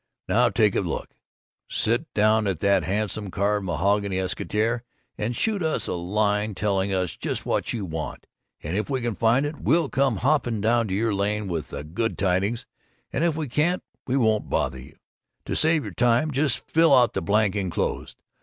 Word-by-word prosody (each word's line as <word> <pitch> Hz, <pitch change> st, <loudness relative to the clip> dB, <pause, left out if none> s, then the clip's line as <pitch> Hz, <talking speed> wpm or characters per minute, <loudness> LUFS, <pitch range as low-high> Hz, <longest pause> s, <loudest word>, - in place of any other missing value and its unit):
Now -, -, +3 dB
take -, -, +3 dB
a -, -, +2 dB
look: -, -, -4 dB, 0.6 s
Sit 115 Hz, +2 st, +1 dB
right 155 Hz, -, -22 dB
down 110 Hz, 0 st, +3 dB
at 95 Hz, -5 st, -1 dB
the 100 Hz, -3 st, +3 dB
handsome 105 Hz, +3 st, -2 dB
carved 100 Hz, +1 st, 0 dB
mahogany 100 Hz, +3 st, +1 dB
escritoire 105 Hz, +5 st, -1 dB, 0.3 s
and 115 Hz, +3 st, -2 dB
shoot 210 Hz, -, 0 dB
us 160 Hz, -2 st, 0 dB
in -, -, -1 dB
a -, -, -3 dB
line 105 Hz, +3 st, 0 dB
telling 100 Hz, -1 st, 0 dB
us 95 Hz, -3 st, -1 dB
just -, -, -4 dB
what -, -, -1 dB
you 110 Hz, -5 st, -3 dB
want, 80 Hz, -2 st, -5 dB, 0.4 s
and 80 Hz, +4 st, -3 dB
if 105 Hz, +5 st, -1 dB
we 130 Hz, -2 st, -1 dB
can 120 Hz, -1 st, -1 dB
find 115 Hz, +7 st, +2 dB
it 145 Hz, 0 st, -5 dB
we'll 165 Hz, -3 st, +2 dB
come 135 Hz, -3 st, +2 dB
hopping 125 Hz, -1 st, +1 dB
down 115 Hz, +1 st, +2 dB
your 105 Hz, +3 st, 0 dB
lane 105 Hz, +1 st, -1 dB
with 80 Hz, -4 st, -3 dB
the -, -, -6 dB
good 95 Hz, +9 st, -2 dB
tidings, 100 Hz, +4 st, 0 dB, 0.5 s
and 150 Hz, -, 0 dB
if 170 Hz, -3 st, +2 dB
we 155 Hz, -2 st, -3 dB
can't, 155 Hz, +8 st, +1 dB, 0.2 s
we 130 Hz, +1 st, +1 dB
won't 110 Hz, -4 st, +1 dB
bother 65 Hz, -, -1 dB
you. 65 Hz, -, -14 dB, 0.5 s
To -, -, -2 dB
save 160 Hz, -1 st, +3 dB
your -, -, -7 dB
time, 120 Hz, +5 st, +2 dB
just 140 Hz, -1 st, 0 dB
fill 165 Hz, -3 st, +5 dB
out 125 Hz, -2 st, +4 dB
the -, -, -1 dB
blank 105 Hz, -1 st, +2 dB
enclosed. 95 Hz, -4 st, -2 dB
105 Hz, 190 wpm, -25 LUFS, 95-125 Hz, 0.6 s, fill